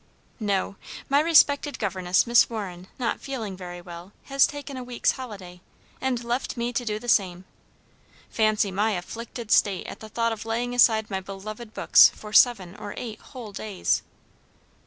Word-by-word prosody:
"No; 200 Hz, -2 st, -1 dB, 0.3 s
my 280 Hz, +1 st, +4 dB
respected 290 Hz, -3 st, +4 dB
governess, 185 Hz, -3 st, +1 dB
Miss 235 Hz, 0 st, +5 dB
Warren, 190 Hz, -5 st, -6 dB
not 240 Hz, -3 st, -1 dB
feeling 225 Hz, -8 st, -5 dB
very 175 Hz, -1 st, -8 dB
well, 175 Hz, +2 st, -11 dB
has 275 Hz, 0 st, +4 dB
taken 285 Hz, -1 st, -7 dB
a 255 Hz, -, -5 dB
week's 245 Hz, -1 st, 0 dB
holiday, 195 Hz, -9 st, -9 dB, 0.4 s
and 255 Hz, -2 st, -1 dB
left 240 Hz, +2 st, -2 dB
me 240 Hz, +1 st, -2 dB
to 245 Hz, -, -1 dB
do 210 Hz, -3 st, -2 dB
the 240 Hz, +3 st, -10 dB
same. 185 Hz, -5 st, +1 dB, 0.8 s
Fancy 215 Hz, -2 st, +1 dB
my 210 Hz, +3 st, +1 dB
afflicted 225 Hz, +5 st, -6 dB
state 195 Hz, -3 st, +3 dB
at -, -, -8 dB
the 220 Hz, -, -10 dB
thought 230 Hz, +1 st, 0 dB
of 220 Hz, -1 st, -5 dB
laying 235 Hz, +2 st, -2 dB
aside 220 Hz, -3 st, +4 dB
my 190 Hz, -, -1 dB
beloved 210 Hz, +4 st, -9 dB
books -, -, +7 dB
for 210 Hz, 0 st, -11 dB
seven 200 Hz, -7 st, +4 dB
or 205 Hz, -1 st, -7 dB
eight 225 Hz, -3 st, -6 dB
whole 245 Hz, -6 st, -10 dB
days." 200 Hz, -1 st, -1 dB
220 Hz, 165 wpm, -25 LUFS, 195-245 Hz, 0.8 s, books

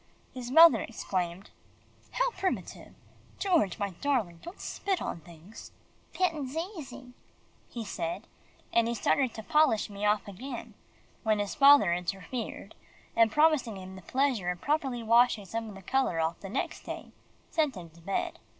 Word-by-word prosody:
His 250 Hz, -2 st, -6 dB
mother 320 Hz, -4 st, +8 dB
exclaimed, 185 Hz, -4 st, -4 dB, 0.6 s
"How -, -, +1 dB
primitive 385 Hz, -4 st, -4 dB, 0.4 s
George, 335 Hz, -, +2 dB
my 200 Hz, -2 st, -2 dB
darling, 200 Hz, -5 st, -1 dB
don't 345 Hz, -, -10 dB
spit 390 Hz, -2 st, -2 dB
on -, -, -4 dB
things." 170 Hz, +5 st, -13 dB, 0.4 s
"'Pittin's 310 Hz, -6 st, -1 dB
easy," 320 Hz, -8 st, -6 dB, 0.6 s
he 235 Hz, -2 st, -6 dB
said, 190 Hz, +1 st, -4 dB, 0.5 s
and 230 Hz, -1 st, +4 dB
he 235 Hz, -, -1 dB
started 260 Hz, +3 st, +2 dB
to 220 Hz, -, -6 dB
polish 270 Hz, -7 st, +3 dB
me 200 Hz, +1 st, -7 dB
off 210 Hz, -1 st, +2 dB
again, 240 Hz, +5 st, -7 dB, 0.5 s
when 215 Hz, -2 st, +2 dB
his 205 Hz, -1 st, -2 dB
father 280 Hz, -, +7 dB
interfered, 195 Hz, +5 st, -4 dB, 0.4 s
and 225 Hz, -1 st, +5 dB
promising 300 Hz, -7 st, +3 dB
him 190 Hz, 0 st, -9 dB
the 190 Hz, -, -10 dB
pleasure 255 Hz, -4 st, 0 dB
of 180 Hz, -1 st, -3 dB
properly 270 Hz, -, -1 dB
washing 230 Hz, -2 st, +4 dB
some 225 Hz, +3 st, -4 dB
of 205 Hz, -, -10 dB
the 195 Hz, -, -12 dB
colour 260 Hz, -6 st, +1 dB
off 160 Hz, +1 st, -1 dB
the 195 Hz, -, -8 dB
next -, -, -3 dB
day, -, -, -7 dB, 0.4 s
sent 305 Hz, -6 st, +1 dB
him 175 Hz, -3 st, -9 dB
back -, -, -27 dB
to 170 Hz, -, -16 dB
bed. 195 Hz, +4 st, -2 dB
230 Hz, 160 wpm, -29 LUFS, 195-280 Hz, 0.6 s, mother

